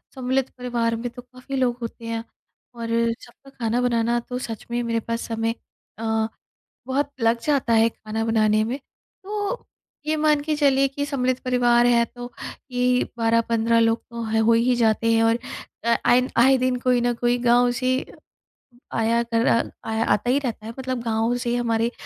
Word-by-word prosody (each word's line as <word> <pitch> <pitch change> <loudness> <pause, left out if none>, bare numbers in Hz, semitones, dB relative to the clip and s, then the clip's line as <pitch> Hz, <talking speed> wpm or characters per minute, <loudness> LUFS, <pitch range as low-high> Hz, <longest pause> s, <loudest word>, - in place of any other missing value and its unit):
सम्मिलित 260 0 0
परिवार 235 -2 -1
में 235 +2 -4
तो 245 +1 -11
काफ़ी 255 +2 -9
लोग 250 -2 +1
होते 230 0 -7
हैं, 230 0 -3 0.5
और 230 -1 -6 0.4
सबका 250 +3 -16
खाना 240 -2 -1
बनाना 235 -1 +1
तो 250 +1 -6
सच 225 -2 -7
में 240 0 0
मेरे 230 -1 0
पास 230 +1 -3
समय 225 0 -1 0.4
अ, 220 -1 0 0.6
बहुत 280 +2 0
लग 230 +1 +3
जाता 275 -6 +1
है 225 0 +5
खाना 220 0 -5
बनाने 215 -1 +3
में। 245 +5 -3 0.5
तो 415 +3 -3 0.4
ये 310 0 +1
मान 300 -1 +3
के 305 0 -1
चलिए 275 -2 +3
कि 285 +1 -3
सम्मिलित 255 -3 0
परिवार 245 -1 +3
है 235 -1 +4
तो 245 +1 -9 0.4
ये 250 0 +2
12-15 230 0 +2
लोग 225 0 +2
तो 235 0 -5
ह 220 0 0
हो 230 - +5
ही 235 +2 +3
जाते 230 0 +2
हैं 225 0 +3
और 225 +1 +3 0.5
अ, 235 0 +3
आए 250 +1 +4
आए 265 +3 +6
दिन 255 0 +1
कोई 250 -1 +2
ना 240 0 +1
कोई 240 0 +2
गाँव 245 +1 +5
से 255 0 +2 1.0
आया 230 +1 +2
कर 230 +1 0
आ 230 - +4 0.3
आया 220 +1 0
आता 240 +4 -1
ही 270 - +3
रहता 235 -6 -4
है 225 - -6
मतलब 255 -2 -3
गाँव 225 +1 0
से 240 0 -1
हमारे 230 -1 0
240 Hz, 180 wpm, -23 LUFS, 230-255 Hz, 1.0 s, आए